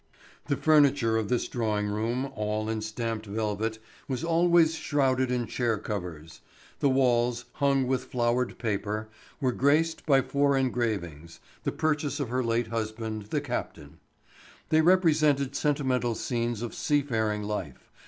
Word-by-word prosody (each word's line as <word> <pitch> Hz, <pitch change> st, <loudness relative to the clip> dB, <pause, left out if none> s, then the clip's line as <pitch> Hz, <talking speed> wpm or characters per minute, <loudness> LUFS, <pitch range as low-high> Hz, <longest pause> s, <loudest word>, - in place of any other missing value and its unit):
The 140 Hz, -2 st, 0 dB
furniture 145 Hz, -7 st, +4 dB
of 110 Hz, -2 st, -1 dB
this 125 Hz, -, 0 dB
drawing 110 Hz, -4 st, -1 dB
room, 115 Hz, +6 st, -2 dB
all 105 Hz, 0 st, -2 dB
in 110 Hz, -1 st, -2 dB
stamped 110 Hz, 0 st, -4 dB
velvet, 110 Hz, +1 st, -2 dB, 0.3 s
was 130 Hz, +2 st, -3 dB
always 170 Hz, -1 st, +4 dB
shrouded 135 Hz, -5 st, +1 dB
in 125 Hz, -1 st, 0 dB
chair 115 Hz, -2 st, -1 dB
covers. 90 Hz, -7 st, -6 dB, 0.4 s
The 140 Hz, -, +3 dB
walls, 125 Hz, -2 st, +2 dB
hung 140 Hz, -2 st, +1 dB
with 130 Hz, 0 st, -1 dB
flowered 120 Hz, 0 st, 0 dB
paper, 110 Hz, -1 st, -2 dB, 0.3 s
were 130 Hz, -4 st, +1 dB
graced 150 Hz, +6 st, +2 dB
by 135 Hz, -3 st, +5 dB
four 140 Hz, 0 st, +2 dB
engravings, 105 Hz, -, -2 dB, 0.2 s
the -, -, 0 dB
purchase 150 Hz, -1 st, -1 dB
of 140 Hz, -5 st, -2 dB
her 125 Hz, +1 st, 0 dB
late 115 Hz, 0 st, 0 dB
husband, 110 Hz, -1 st, -4 dB
the -, -, 0 dB
captain. -, -, -5 dB, 0.7 s
They 160 Hz, 0 st, +4 dB
represented 155 Hz, -6 st, +3 dB
sentimental 130 Hz, -5 st, 0 dB
scenes 120 Hz, 0 st, -2 dB
of 120 Hz, -, -5 dB
seafaring 110 Hz, -8 st, 0 dB
life. 105 Hz, 0 st, -5 dB
120 Hz, 140 wpm, -28 LUFS, 110-140 Hz, 0.7 s, by